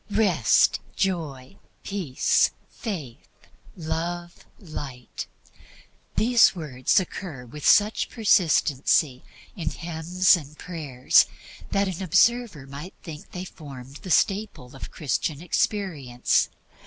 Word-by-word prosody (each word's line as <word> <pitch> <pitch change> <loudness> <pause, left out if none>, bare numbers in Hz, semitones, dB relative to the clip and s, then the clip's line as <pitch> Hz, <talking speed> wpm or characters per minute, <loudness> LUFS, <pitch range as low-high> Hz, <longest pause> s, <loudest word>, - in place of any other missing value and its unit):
Rest, 190 - +3 0.2
Joy, 145 - -2 0.3
Peace, 180 -10 +1 0.2
Faith, 160 - -6 0.5
Love, 170 +1 -4
Light 140 - -7 0.9
these 235 -1 +5
words 140 -6 +1
occur 175 -8 -6
with 145 +5 -10
such 210 +2 +4
persistency 155 - +2 0.3
in 165 -6 -2
hymns 170 +4 +2
and 150 -3 -8
prayers 150 -8 +2 0.4
that 200 0 +1
an 185 -1 -4
observer 190 - +2
might 140 +7 -9
think 155 -3 -9
they 180 0 -6
formed 140 -5 -10
the 190 - -10
staple 180 -9 0
of 135 - -8
Christian 145 0 -2
experience. 165 - 0
165 Hz, 100 wpm, -25 LUFS, 140-190 Hz, 0.9 s, these